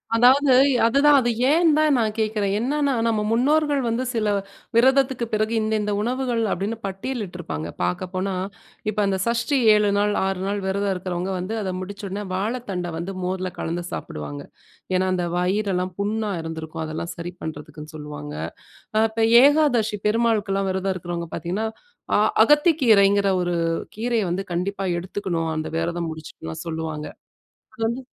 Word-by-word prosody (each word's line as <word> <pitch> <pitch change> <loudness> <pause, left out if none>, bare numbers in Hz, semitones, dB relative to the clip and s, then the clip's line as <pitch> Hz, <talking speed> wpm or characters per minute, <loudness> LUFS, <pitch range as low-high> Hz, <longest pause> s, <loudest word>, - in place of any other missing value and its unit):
அதாவது 260 +4 +5 0.3
அதுதான் 280 +5 +5
அது 240 - +1 0.2
ஏன் 330 +1 +4
தான் 305 -2 +4
நான் 220 -2 0
கேட்கிறேன். 210 -2 0
என்னன்னா 280 +3 +1
நம்ம 220 -2 +1
முன்னோர்கள் 290 +4 +2
வந்து 230 +2 0
சில 225 -3 0 0.5
விரதத்துக்கு 260 0 +3
பிறகு 215 +1 +1
இந்த 215 0 -1
இந்த 210 0 -1
உணவுகள் 245 0 -1
அப்டின்னு 205 +5 -2
பட்டியலிட்டிருப்பாங்க 185 - -4
பார்க்கப்போனா, 185 - -2 0.5
இப்ப 215 0 -2
அந்த 195 -1 +1
சஷ்டி 235 +4 +1 0.2
7 210 -1 +3
நாள் 205 0 +2
6 190 -1 -1
நாள் 200 0 -1
விரதம் 200 +1 0
இருக்கிறவங்க 180 0 -3
வந்து 185 +5 -4
அத 190 -2 -2
முடிச்சோனே 200 +1 -5
வாழைத்தண்ட 200 -3 -3
வந்து 175 +4 -4
மோர்ல 185 0 -2
கலந்து 170 +2 -3
சாப்டுவாங்க. 75 -1 -6 0.5
ஏன்னா 185 +1 +2
அந்த 180 -1 0
வயிறெல்லாம் 185 0 0
புண்ணா 210 +1 -1
இருந்திருக்கும் 160 0 -5
அதெல்லாம் 160 +2 -4
சரி 170 +1 -5
பண்ணுறதுக்குன்னு 155 0 -8
சொல்லுவாங்க. 150 - -7 0.6
ஆ - - +5
இப்ப 225 +1 -3 0.2
ஏகாதசி 270 -8 +3
பெருமாளுக்குலாம் 210 -3 +1
விரதம் 190 +1 -1
இருக்கிறவங்க 175 -1 -5
பார்த்தீங்கன்னா, 180 +7 -2 0.5
ஆ - - +5 0.3
அகத்தி 295 +6 +5
கீரைங்கிற 200 -3 +5
ஒரு 175 0 -1 0.4
கீரைய 230 0 0
வந்து 190 +3 -1
கண்டிப்பா 195 +3 -2
எடுத்துக்கணும். 175 -3 -3
அந்த 155 - -2
விரதம் 170 0 -2
முடிச்சுட்டுலாம் 150 - -8
சொல்லுவாங்க. 160 -2 -4 0.7
அது 220 - -8
வந்து 235 +3 -3
200 Hz, 145 wpm, -23 LUFS, 175-230 Hz, 0.7 s, அதாவது